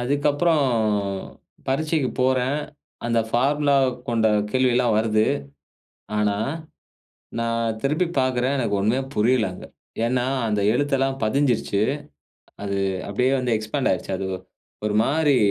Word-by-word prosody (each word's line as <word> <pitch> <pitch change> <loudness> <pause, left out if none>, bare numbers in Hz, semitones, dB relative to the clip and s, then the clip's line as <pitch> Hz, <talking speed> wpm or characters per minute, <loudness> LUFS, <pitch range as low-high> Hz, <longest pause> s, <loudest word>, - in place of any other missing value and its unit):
அதுக்கப்பறம், 145 +4 +2 1.0
பரீட்சைக்குப் 150 -1 0
போறேன். 130 +2 +1 0.5
அந்த 115 -1 +2
பார்முலாவ 140 +2 +3 0.2
கொண்ட 115 -2 +2 0.2
கேள்வியெல்லாம் 125 -2 +2
வருது. 110 -1 +2 0.9
ஆனா, 105 -1 +1 1.0
நான் 115 -1 -1
திருப்பி 155 +6 +1
பாக்கிறேன். 130 +1 +1
எனக்கு 105 -5 0
ஒண்ணுமே 110 +6 +1
புரியல 110 -1 +2
அங்க. 90 - -10 0.4
ஏன்னா, 125 +1 0 0.2
அந்த 105 -1 0
எழுத்தெல்லாம் 135 -1 0
பதிஞ்சிருச்சு. 120 -4 +1 0.8
அது 100 -1 -2 0.3
அப்டியே 125 +6 +1
வந்து 125 -3 +1
எக்ஸ்பேண்ட் 110 +6 -1
ஆயிருச்சு. 95 - -2
அது 95 - -3
ஒ - - -5 0.5
ஒரு 105 - 0
மாரி 145 0 +2
125 Hz, 110 wpm, -23 LUFS, 110-140 Hz, 1.0 s, பார்முலாவ